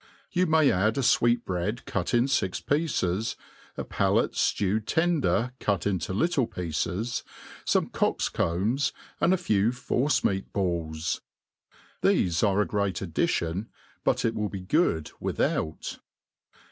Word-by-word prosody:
You 180 Hz, 0 st, +2 dB
may 160 Hz, -3 st, +5 dB
add 110 Hz, +6 st, +1 dB
a -, -, +2 dB
fweetbread 115 Hz, -4 st, +1 dB
cut -, -, -2 dB
in 120 Hz, +1 st, +3 dB
fix 95 Hz, -9 st, 0 dB
pieces^ 115 Hz, -, 0 dB, 0.4 s
a -, -, -2 dB
palate -, -, +1 dB
ftewed 105 Hz, +2 st, 0 dB
tender 125 Hz, -, +2 dB
cut 100 Hz, -5 st, 0 dB
into 95 Hz, -3 st, -1 dB
little 140 Hz, -, +1 dB
pieces, 90 Hz, +7 st, -2 dB, 0.4 s
fome -, -, +2 dB
cock*s*combs, 110 Hz, +12 st, 0 dB, 0.3 s
and 175 Hz, -, +3 dB
a 190 Hz, -, +4 dB
few 110 Hz, -, +2 dB
force 130 Hz, +3 st, 0 dB
meat 95 Hz, 0 st, 0 dB
balls. 85 Hz, -4 st, -1 dB, 0.8 s
Tbefe 85 Hz, -1 st, +2 dB
are 100 Hz, +1 st, +2 dB
a -, -, +2 dB
great 100 Hz, -3 st, -1 dB
addition, 85 Hz, +3 st, -1 dB, 0.3 s
btit -, -, +2 dB
ic -, -, -5 dB
will 105 Hz, -2 st, -2 dB
be 95 Hz, -1 st, -6 dB
good 90 Hz, -, +1 dB
without. 80 Hz, -1 st, -2 dB
105 Hz, 130 wpm, -27 LUFS, 90-125 Hz, 0.8 s, may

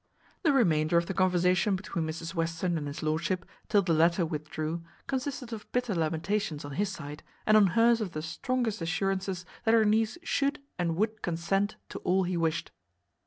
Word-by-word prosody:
The 325 Hz, -, +4 dB
remainder 170 Hz, -, +3 dB
of 170 Hz, -, +3 dB
the 195 Hz, -, -3 dB
conversation 180 Hz, +1 st, +3 dB
between 170 Hz, -4 st, -3 dB
Mrs 165 Hz, +1 st, -5 dB
Western 165 Hz, +1 st, -1 dB
and 150 Hz, -3 st, -2 dB
his 145 Hz, +2 st, -6 dB
lordship, 165 Hz, +4 st, 0 dB, 0.2 s
till 205 Hz, -2 st, +4 dB
the 175 Hz, -2 st, +1 dB
latter 170 Hz, +2 st, +4 dB
withdrew, 155 Hz, +1 st, -3 dB, 0.2 s
consisted 260 Hz, -2 st, -3 dB
of 215 Hz, -, -8 dB
bitter 245 Hz, -3 st, 0 dB
lamentations 165 Hz, +1 st, -1 dB
on 145 Hz, -, -7 dB
his 200 Hz, +7 st, 0 dB
side, 150 Hz, -5 st, -7 dB, 0.2 s
and 215 Hz, -, +5 dB
on 210 Hz, -2 st, +7 dB
hers 230 Hz, 0 st, +5 dB
of 195 Hz, -5 st, -3 dB
the 155 Hz, -, -4 dB
strongest 225 Hz, +5 st, -1 dB
assurances 190 Hz, +2 st, -1 dB, 0.2 s
that 225 Hz, 0 st, +4 dB
her 220 Hz, -1 st, +5 dB
niece 220 Hz, +6 st, +2 dB
should 280 Hz, -2 st, +1 dB, 0.2 s
and 170 Hz, -2 st, 0 dB
would 215 Hz, +3 st, -1 dB
consent 195 Hz, +5 st, 0 dB
to -, -, -6 dB
all 190 Hz, +1 st, +2 dB
he 180 Hz, 0 st, -1 dB
wished. 165 Hz, 0 st, 0 dB
180 Hz, 180 wpm, -29 LUFS, 165-215 Hz, 0.2 s, on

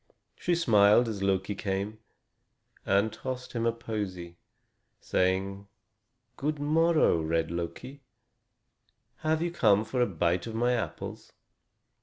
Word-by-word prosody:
She 175 Hz, -, 0 dB
smiled 110 Hz, -6 st, +5 dB
as 105 Hz, -3 st, -4 dB
Loki 95 Hz, +1 st, 0 dB
came, 100 Hz, +1 st, -3 dB, 0.9 s
and 100 Hz, +3 st, +2 dB
tossed 130 Hz, -1 st, -6 dB
him 115 Hz, -1 st, 0 dB
a -, -, +3 dB
posy, 100 Hz, -7 st, -5 dB, 0.6 s
saying: 95 Hz, +2 st, -1 dB, 0.7 s
"Good 150 Hz, +2 st, -1 dB
morrow, 155 Hz, -, +3 dB
red 80 Hz, +1 st, 0 dB
Loki. 120 Hz, +11 st, -6 dB, 1.2 s
Have 160 Hz, +1 st, 0 dB
you 175 Hz, -, -1 dB
come 110 Hz, -9 st, +3 dB
for 125 Hz, +3 st, -1 dB
a 120 Hz, -, +3 dB
bite 85 Hz, +1 st, 0 dB
of 110 Hz, -, -6 dB
my 120 Hz, +2 st, +2 dB
apples? 120 Hz, -, -5 dB
110 Hz, 120 wpm, -29 LUFS, 95-125 Hz, 1.2 s, smiled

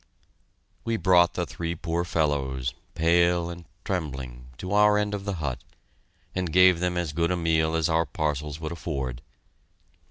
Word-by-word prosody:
We 115 Hz, -1 st, -1 dB
brought 90 Hz, -1 st, +4 dB
the -, -, -1 dB
three 85 Hz, 0 st, -4 dB
poor 85 Hz, +1 st, -2 dB
fellows, 70 Hz, -6 st, -1 dB, 0.2 s
pale 85 Hz, +1 st, +3 dB
and 85 Hz, 0 st, -10 dB, 0.2 s
trembling, 65 Hz, -9 st, -4 dB
to 90 Hz, -, -6 dB
our 105 Hz, 0 st, +5 dB
end 105 Hz, 0 st, 0 dB
of 100 Hz, -1 st, -4 dB
the 100 Hz, -1 st, -2 dB
hut, 65 Hz, -6 st, -4 dB, 0.7 s
and 90 Hz, -3 st, -2 dB
gave 90 Hz, 0 st, +6 dB
them 90 Hz, 0 st, -1 dB
as 85 Hz, -4 st, -2 dB
good 85 Hz, +2 st, +1 dB
a 90 Hz, -, 0 dB
meal 80 Hz, -1 st, +1 dB
as 80 Hz, -1 st, +2 dB
our 80 Hz, -1 st, +1 dB
parcels 75 Hz, 0 st, -2 dB
would 80 Hz, 0 st, -4 dB
afford. 70 Hz, -7 st, -4 dB
85 Hz, 160 wpm, -26 LUFS, 75-90 Hz, 0.7 s, gave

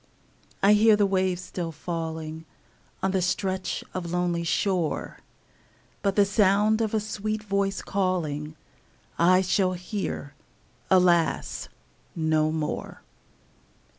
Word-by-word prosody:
I 200 Hz, +1 st, +7 dB
hear 215 Hz, +1 st, +6 dB
the 205 Hz, -1 st, +3 dB
waves 185 Hz, -2 st, 0 dB
still 170 Hz, -2 st, -4 dB
falling 160 Hz, -1 st, -5 dB, 0.6 s
On 190 Hz, -, +2 dB
the 190 Hz, -1 st, +1 dB
stretch 185 Hz, +1 st, -1 dB
of 175 Hz, -2 st, -4 dB
lonely 175 Hz, -1 st, 0 dB
shore, 175 Hz, -1 st, -1 dB, 0.8 s
But 200 Hz, -1 st, 0 dB
the 205 Hz, -, +5 dB
sound 210 Hz, +2 st, +3 dB
of 220 Hz, -1 st, 0 dB
a -, -, +3 dB
sweet 215 Hz, 0 st, -3 dB
voice 200 Hz, -1 st, -1 dB
calling 155 Hz, -6 st, -2 dB, 0.6 s
I 185 Hz, +2 st, +5 dB
shall 185 Hz, 0 st, +1 dB
hear, 180 Hz, -5 st, -4 dB, 0.6 s
alas! 170 Hz, -, +2 dB, 0.5 s
no 155 Hz, -1 st, +1 dB
more. 155 Hz, -1 st, -4 dB
185 Hz, 110 wpm, -26 LUFS, 165-200 Hz, 0.8 s, I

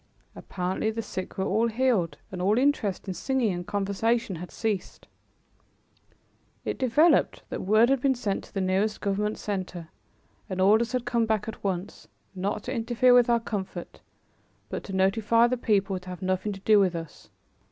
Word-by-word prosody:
Apparently 185 Hz, +3 st, -2 dB
the 225 Hz, +1 st, -3 dB
sick 185 Hz, -3 st, -6 dB
were 190 Hz, -, 0 dB
all 220 Hz, +4 st, +2 dB
healed 230 Hz, -7 st, +1 dB
and 185 Hz, -1 st, -5 dB
all 205 Hz, +4 st, +2 dB
interest 250 Hz, -9 st, +1 dB
in 190 Hz, -, -2 dB
singing 250 Hz, -1 st, 0 dB
and 175 Hz, 0 st, -6 dB
conversation 205 Hz, +1 st, 0 dB
had 180 Hz, +2 st, -8 dB
ceased. 210 Hz, -5 st, -3 dB, 1.6 s
It -, -, -3 dB
developed 280 Hz, +7 st, +3 dB
that -, -, -4 dB
word 215 Hz, +5 st, +4 dB
had 270 Hz, -2 st, +2 dB
been 270 Hz, -1 st, +2 dB
sent 210 Hz, -5 st, -2 dB
to -, -, -20 dB
the 195 Hz, -, 0 dB
nearest 195 Hz, +3 st, 0 dB
government 210 Hz, +2 st, -1 dB
center, 185 Hz, -5 st, -5 dB, 0.6 s
and 185 Hz, -1 st, -4 dB
orders 220 Hz, +5 st, +4 dB
had 250 Hz, -1 st, -1 dB
come 230 Hz, -1 st, +1 dB
back 220 Hz, -1 st, 0 dB
at 225 Hz, -, -7 dB
once, 190 Hz, -1 st, -4 dB, 0.3 s
not 200 Hz, +2 st, -3 dB
to 255 Hz, -, -4 dB
interfere 240 Hz, +1 st, +3 dB
with 245 Hz, -1 st, +5 dB
our 235 Hz, 0 st, +4 dB
comfort 195 Hz, -6 st, -6 dB, 0.7 s
but -, -, -4 dB
to 195 Hz, -, -7 dB
notify 210 Hz, +4 st, +3 dB
the 245 Hz, +1 st, +1 dB
people 200 Hz, -5 st, 0 dB
to 180 Hz, 0 st, -12 dB
have 180 Hz, 0 st, -7 dB
nothing 185 Hz, +2 st, -1 dB
to 195 Hz, -, -10 dB
do 210 Hz, +1 st, +5 dB
with 185 Hz, -3 st, +2 dB
us. 165 Hz, -2 st, -8 dB
210 Hz, 175 wpm, -27 LUFS, 190-230 Hz, 1.6 s, with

